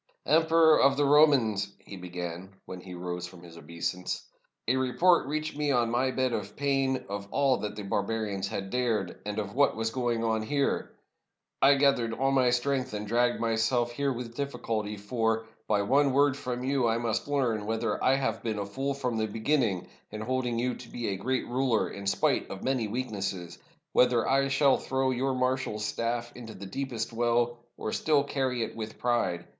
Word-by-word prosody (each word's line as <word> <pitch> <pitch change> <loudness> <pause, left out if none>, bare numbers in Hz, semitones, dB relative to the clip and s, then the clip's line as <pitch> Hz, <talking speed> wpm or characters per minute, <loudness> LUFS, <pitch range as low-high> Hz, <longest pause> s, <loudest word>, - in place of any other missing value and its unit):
"Emperor 160 0 +5
of 135 0 +4
the 145 - +3
Romans," 130 -9 +4
he 100 - -11
began, 90 0 -6 0.2
when 90 -1 -8
he 90 -1 -9
rose 90 0 -4
from 90 -1 -14
his 85 -1 -12
obeisance, 85 +3 -4 0.4
"a 125 - +3
report 130 +7 +3
reached 155 +1 -3
me 150 0 -1
on 120 -4 +2
my 125 +2 +2
bed 130 -1 0
of 105 -2 -4
pain 135 -2 0
of 100 0 -5
all 135 0 +2
that 105 0 -4
the 105 - -6
barbarians 100 0 -2
had 95 -1 -5
dared, 115 -7 -1
and 105 0 -3
of 100 -2 -3
what 140 +2 +3
was 115 0 -1
going 120 -2 -1
on 110 -1 +1
here. 140 +5 0 0.7
I 140 +1 +7
gathered 135 -5 +2
all 135 +3 +1
my 130 -2 +4
strength 130 -1 0
and 105 0 -4
dragged 120 +3 +1
myself 115 +1 +1
here 140 +3 -1
with 120 -2 -6
difl&culty, 110 -7 -3
for, 115 +1 0 0.2
by 105 -2 +2
one 135 +5 +3
word 140 0 +4
from 125 -2 -4
you, 130 -2 +1
I 115 0 +2
must 115 0 -1
learn 120 -7 0
whether 115 +1 -1
I 130 - +4
have 115 -5 -1
been 110 -2 -2
a 100 - -2
fool 135 +7 -3
from 125 -4 -2
the 110 - 0
beginning 110 - 0 0.2
in 105 0 -6
holding 125 0 -1
you 125 +1 0
to 120 - -11
be 120 -3 -3
a 100 - -1
great 130 +7 -1
ruler 125 -2 +1
in 100 0 -7
spite - - +1
of 95 - -7
many 130 -4 0
weaknesses; 100 -7 -4 0.3
whether 125 -2 +4
I 135 0 +3
shall 135 0 +4
throw 130 0 0
your 130 +1 0
mar 130 0 +2
shal's 105 -4 -4
stafT 115 +2 -2
into 115 -3 -9
the 100 - -8
deepest 120 0 -4
well, 120 +1 +1 0.2
or 110 - -3
still 150 -3 +2
carry 130 -4 -1
it - - -6
with 110 -1 -6
pride. 95 -8 0
120 Hz, 195 wpm, -28 LUFS, 105-135 Hz, 0.7 s, I